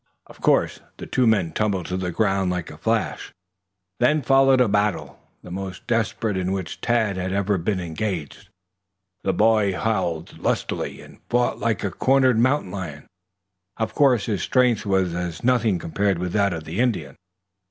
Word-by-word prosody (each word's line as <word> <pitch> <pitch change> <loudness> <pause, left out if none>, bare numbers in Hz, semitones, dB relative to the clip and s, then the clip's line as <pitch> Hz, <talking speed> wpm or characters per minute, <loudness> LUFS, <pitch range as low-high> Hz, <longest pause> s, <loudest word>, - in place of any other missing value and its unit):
Of - - -17
course - - +2 0.2
the - - -7
two 125 -2 +1
men 100 -7 +2
tumbled 100 -1 -1
to 90 - -3
the 95 -1 -2
ground 95 -1 +1
like 90 -1 -3
a - - -11
flash. - - -1 0.7
Then 145 +4 +3
followed 135 +1 +5
a 125 - +4
battle, 105 -2 -1 0.2
the 90 - -10
most 95 0 -6
desperate 115 -2 -1
in 95 0 -1
which 95 -3 -4
Tad 110 -5 +1
ever 100 +2 0
had 90 -4 -2
been 100 -3 0
engaged. 85 -2 -4 0.7
The 95 - +1
boy 105 -2 +3
howled 85 -6 -2
lustily - - -2
and - - -15
fought 120 0 +1
like 115 -4 -1
a 100 - -1
cornered 130 -1 +3
mountain 130 -5 +2
lion. 85 -7 -6 0.7
Of 110 -1 -2
course 130 -8 +3
his 105 -4 -2
strength 125 -5 +2
was 95 -3 +1
as 85 -1 -4
nothing 120 -5 +2
compared 95 +3 -1
with 90 0 -3
that 100 -2 +2
of 80 -2 -5
the 80 +6 -5
Indian. 95 - 0
100 Hz, 170 wpm, -23 LUFS, 90-115 Hz, 0.7 s, followed